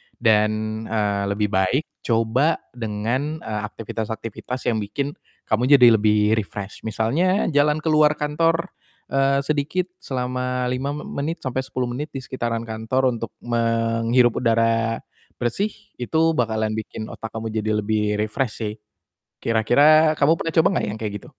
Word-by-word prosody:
dan, 110 -1 +1
eee, 105 -2 0
lebih 100 +1 -1
baik 95 +9 +2 0.2
coba 115 +7 +2 0.2
dengan, 120 +7 -3
eee, 105 -1 -3
aktivitas-aktivitas 115 +3 -5
yang 110 - 0
bikin 135 +8 -3 0.3
kamu 125 +6 +4
jadi 125 -3 +7
lebih 105 0 +3 0.2
refresh. 100 +1 -6
Misalnya 165 - +1
jalan 150 +1 +2
keluar 155 -1 +4
kantor, 165 +4 0 0.4
eee, 135 0 +2
sedikit 155 +5 -1
selama 125 -1 -2
5 135 +3 -2
me 150 - -6 0.2
menit 160 +4 -3
sampai 130 0 -2
10 130 -1 -2
menit 145 +5 -5
di 135 - -4
sekitaran 120 -3 -3
kantor 115 +4 0
untuk 115 - -5
menghirup 115 +1 +2
udara 115 -1 +1 0.3
bersih, 195 - -1 0.3
itu 160 +6 +2
bakalan 110 -6 0
bikin 110 0 -5
otak 110 - -6
kamu 110 0 -4
jadi 110 0 -1
lebih 105 0 0
refresh, 110 +3 -1
sih. 105 0 -3 0.6
Kira-kira 150 +8 +4
kamu 150 +3 +5
pernah 165 0 -3
coba 165 +2 +5
nggak - - 0
yang 110 - -6
kayak 105 -2 -4
gitu? - - -17
120 Hz, 145 wpm, -22 LUFS, 110-145 Hz, 0.6 s, jadi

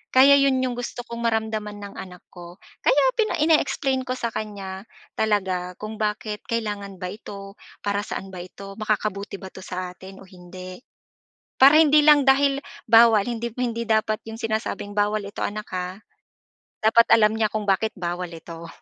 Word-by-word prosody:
Kaya 265 +2 +8
'yun 270 -2 +2
yung 255 -1 -1
gusto 245 0 -5
kong 235 -1 -6
maramdaman 220 -2 -2
ng 200 -1 -9
anak 180 -2 -10
ko, 175 -1 -11 0.3
kaya 280 +1 +4 0.2
pina 435 -1 +2
ine-explain 295 -4 +2
ko 255 - -1
sa 235 -2 -3
kanya, 200 -1 -6 0.3
talaga, 190 -4 -1
kung 215 0 -7
bakit 210 0 -2
kailangan 205 -4 -3
ba 180 -1 -4
ito, 200 -2 -10 0.3
para 205 0 0
saan 195 -2 -6
ba 185 - -8
ito, 195 +2 -11
makakabuti 210 -2 -2
ba 190 -1 -9
'to - - -11
sa 180 0 -5
atin 190 +2 -13
o - - -15
hindi? 185 0 -11 0.8
Para 280 +4 +7
hindi 300 -1 +6
lang 295 -2 +6
dahil 275 +1 +4 0.3
bawal, 225 -3 +6
hindi, 235 -1 -4
hindi 235 -2 -2
dapat 220 -1 +1
yung 225 0 -7
sinasabing, 220 -2 -2
"Bawal 210 +1 +1
ito - - -19
anak, 210 +1 -4
ha." 185 +1 -4 0.9
Dapat 230 +2 +5
alam 215 -1 +3
niya 220 - +3
kung 215 -1 -1
bakit 220 +3 +1
bawal 180 -1 -3
ito. 165 0 -10
215 Hz, 170 wpm, -24 LUFS, 190-235 Hz, 0.9 s, Kaya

